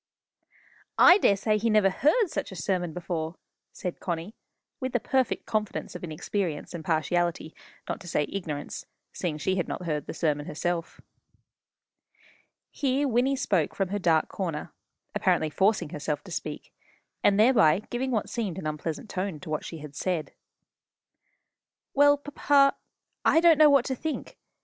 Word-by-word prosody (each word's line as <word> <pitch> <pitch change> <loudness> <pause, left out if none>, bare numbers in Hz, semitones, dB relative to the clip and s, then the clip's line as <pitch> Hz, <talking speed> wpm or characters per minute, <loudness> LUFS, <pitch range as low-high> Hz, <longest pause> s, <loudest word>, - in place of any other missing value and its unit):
"I 360 +3 +8
daresay 210 - +2
he 230 +2 +1
never 210 -3 +4
heard 355 - +2
such - - -3
a - - -8
sermon 175 +1 -1
before!" 165 -1 -4 0.4
said 180 -2 -5
Connie, 175 +3 -4 0.5
with 260 -1 -3
the 245 - +2
perfect 260 +2 0
confidence 215 -2 -2
of - - -8
inexperience 170 0 -3
and 170 -2 -6
partiality 165 +1 0 0.3
not - - -3
to 180 - -11
say 150 -2 +1
ignorance, 160 -7 -5 0.3
seeing 165 -5 -3
she 190 +5 0
had 180 - -1
not 180 - -5
heard 150 -3 -2
the - - -6
sermon 150 -3 0
herself. 170 +2 -3 1.7
Here 280 0 0
Wynnie 255 +2 +2
spoke 180 - 0
from 195 -2 -1
her 205 +1 -2
dark 165 -4 +3
corner, 165 -6 -4 0.4
apparently 155 -1 +1
forcing 195 +1 +2
herself 150 -1 -3
to - - -12
speak, - - -6 0.5
and 200 0 +4
thereby 215 -6 +5
giving 255 +2 -1
what 220 -5 0
seemed 210 -8 -3
an 190 - -6
unpleasant 155 +5 -4
tone 185 -5 -3
to 155 - -8
what 155 - -2
she 160 -3 -7
said. 160 +2 -3 1.6
"Well, 285 +1 +5
papa, 285 -1 +3 0.5
I 325 - +5
don't 330 -2 +5
know 305 -1 +8
what 280 -3 +4
to 265 - -1
think. 315 +4 -5
185 Hz, 155 wpm, -27 LUFS, 160-240 Hz, 1.7 s, I